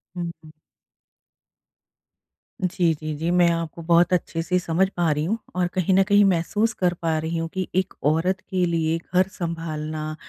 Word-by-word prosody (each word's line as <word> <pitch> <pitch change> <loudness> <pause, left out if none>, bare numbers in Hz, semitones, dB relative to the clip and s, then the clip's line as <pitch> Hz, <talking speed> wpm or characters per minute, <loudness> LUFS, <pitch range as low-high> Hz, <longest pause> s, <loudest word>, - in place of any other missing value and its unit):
हुँ, 170 -1 -3
हुँ। 155 - -13 2.1
जी, 175 -2 +2
जी, 155 0 -5
जी। 160 +3 -2
मैं 175 -1 +4
आपको 165 0 -3
बहुत 170 +2 +3
अच्छे 170 -2 0
से 180 +1 +1
समझ 175 +2 +1
पा 170 -3 +2
रही 150 +1 0
हूँ, 220 +7 0 0.2
और 180 -1 +1
कहीं 185 0 +1
न 195 - +5
कहीं 205 +1 +4
महसूस 200 +5 +1
कर 180 -4 +1
पा 165 -1 +1
रही 160 +2 -2
हूँ 165 0 -2
कि 190 -1 -2
एक 185 +1 0 0.2
औरत 180 +4 0
के 185 -1 +1
लिए 165 -1 0 0.2
घर 185 +1 +4
सँभालना 155 -3 -4
170 Hz, 175 wpm, -23 LUFS, 160-185 Hz, 2.1 s, न